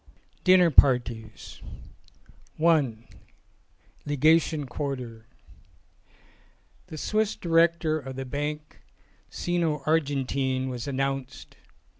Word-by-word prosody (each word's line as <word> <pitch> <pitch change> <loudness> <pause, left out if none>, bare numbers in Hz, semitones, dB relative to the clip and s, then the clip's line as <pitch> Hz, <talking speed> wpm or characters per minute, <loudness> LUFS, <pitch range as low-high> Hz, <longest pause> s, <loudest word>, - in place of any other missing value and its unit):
26 - - -30
VI - - -36
DINNER 185 -2 +6
PARTIES 120 -6 +1 1.0
i: 155 -8 +2 1.1
LEGATION 155 +1 +2
QUARTER 125 -4 -6 1.6
THE 155 - -9
Swiss 215 +6 -1
director 165 -2 +2
of 135 -2 -8
the 135 0 -5
Banque 150 +3 -5 0.5
Sino 170 -4 -2
Argentine 135 -4 0
was 125 +1 -6
announced. 135 -1 -4
145 Hz, 85 wpm, -26 LUFS, 130-160 Hz, 1.6 s, DINNER